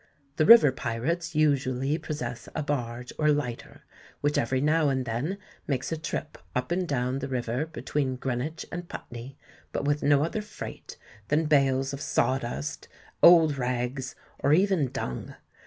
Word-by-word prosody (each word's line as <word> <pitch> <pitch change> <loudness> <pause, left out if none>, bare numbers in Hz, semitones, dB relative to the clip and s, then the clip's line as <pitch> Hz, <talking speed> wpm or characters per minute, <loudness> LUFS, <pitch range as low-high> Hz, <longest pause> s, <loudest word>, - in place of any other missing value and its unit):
The 155 -2 +3
river 230 - +9
pirates 145 +8 -2
usually 140 -1 +1
possess 125 -6 -5
a - - -1
barge 125 -4 -3
or 150 -1 +3
lighter, 135 -5 -3 0.4
which 145 0 +1
every 130 +3 +1
now 150 +1 +3
and 130 -2 0
then 125 +12 -2 0.3
makes 135 -1 -1
a - - +1
trip 155 -1 -5 0.2
up 125 +5 -1
and 180 +1 0
down 130 -2 -1
the 135 - -4
river 125 +2 -2
between 145 -4 -2
Greenwich 130 +5 -3
and 175 0 -6
Putney, 120 +4 -8 0.3
but - - -2
with 145 +1 +1
no 145 0 +4
other 170 +7 -2
freight 210 - -9 0.3
than 155 +2 +2
bales 135 -2 +2
of 140 - -5
sawdust, 135 +1 -1 0.3
old 160 -5 +7
rags, 125 +1 -2 0.2
or 145 - +3
even 185 -4 +3
dung. 65 - -5
140 Hz, 155 wpm, -27 LUFS, 125-155 Hz, 0.4 s, river